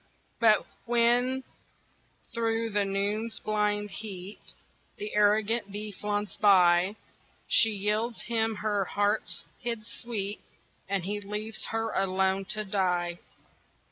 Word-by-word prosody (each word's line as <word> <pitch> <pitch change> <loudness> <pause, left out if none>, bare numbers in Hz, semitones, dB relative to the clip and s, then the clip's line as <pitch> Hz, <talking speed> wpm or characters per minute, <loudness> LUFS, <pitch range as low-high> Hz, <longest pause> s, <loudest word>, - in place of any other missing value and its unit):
But 220 -3 +5 0.2
when, 240 +2 +3 0.9
through 225 -1 0
the 205 0 +2
noon's 205 +3 -1
blind 210 -1 0
heat, 200 -2 -8 0.6
The 210 - -5
arrogant 210 +1 +2
bee 210 +1 -5
flaunts 205 +1 -3
by, 185 -1 +5 0.5
She 225 - +6
yields 215 +3 -1
him 225 -1 +1
her 205 -2 +1
heart's 205 +3 0 0.2
hid 230 -3 -3
sweet, 215 -4 -4 0.5
And 195 -3 0
he 205 +1 -2
leaves 210 +2 -5
her 225 0 -2
alone, 190 0 +1
to 215 +2 +1
die. 180 -3 0
210 Hz, 110 wpm, -28 LUFS, 195-225 Hz, 0.9 s, She